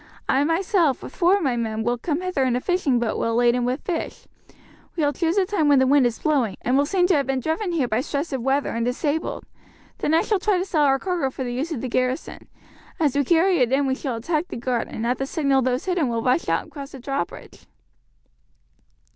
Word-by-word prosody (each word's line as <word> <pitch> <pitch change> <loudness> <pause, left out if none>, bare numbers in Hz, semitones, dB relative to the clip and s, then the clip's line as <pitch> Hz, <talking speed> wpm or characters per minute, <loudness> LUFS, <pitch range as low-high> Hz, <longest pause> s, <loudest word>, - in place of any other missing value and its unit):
I, 270 +2 +3
myself, 330 - +1
with - - -9
four 370 +2 +4
of 395 - -3
my 260 -4 +1
men 220 -2 -2
will 240 +1 -1
come 310 +5 -2
hither 365 -7 -1
in 255 -2 +1
a - - +1
fishing 300 -5 +1
boat 235 -2 -1
well 230 0 0
laden 240 +1 +3
with 255 +3 -2
fish; 340 -3 -4 0.7
we 315 - +1
will 290 - +1
choose 335 +4 0
a 390 - +4
time 370 -6 0
when 285 -1 +5
the 260 - +4
wind 270 -1 +4
is 235 - -4
blowing, 270 -10 0
and 250 - +1
will 285 +1 +3
seem 365 +1 +2
to 365 - +3
have 280 -4 +1
been 270 -1 0
driven 320 - -2
here 305 -7 0
by 225 +1 0
stress 285 +3 -3
of 265 - -2
weather 270 +3 +1
and 230 0 -2
disabled. 290 +6 -2 0.5
Then 310 - +1
I 330 - +3
shall 420 -3 0
try 405 0 +1
to 360 - -1
sell 315 -6 +2
our 270 -1 +4
cargo 345 -3 -1
for 260 - -6
the 245 -1 -4
use 285 +7 -3
of 270 -8 -3
the 260 - -3
garrison. 255 +4 -2 0.5
As 295 -5 +1
we 285 - +3
carry 345 +5 +3
it 250 -1 +2
in 275 +1 +2
we 265 - +1
shall 260 -2 -3
attack 305 +8 -2
the - - -6
guard, 240 0 -1
and 225 - -5
at 245 +2 0
the 270 - -2
signal 275 -3 +1
those 255 +1 -1
hidden 355 -8 0
will 230 -1 -2
rush 255 +6 +1
out - - +1
and - - -18
cross 280 -1 -9
the 270 - -8
drawbridge." 265 -8 -5
275 Hz, 250 wpm, -23 LUFS, 250-330 Hz, 0.7 s, when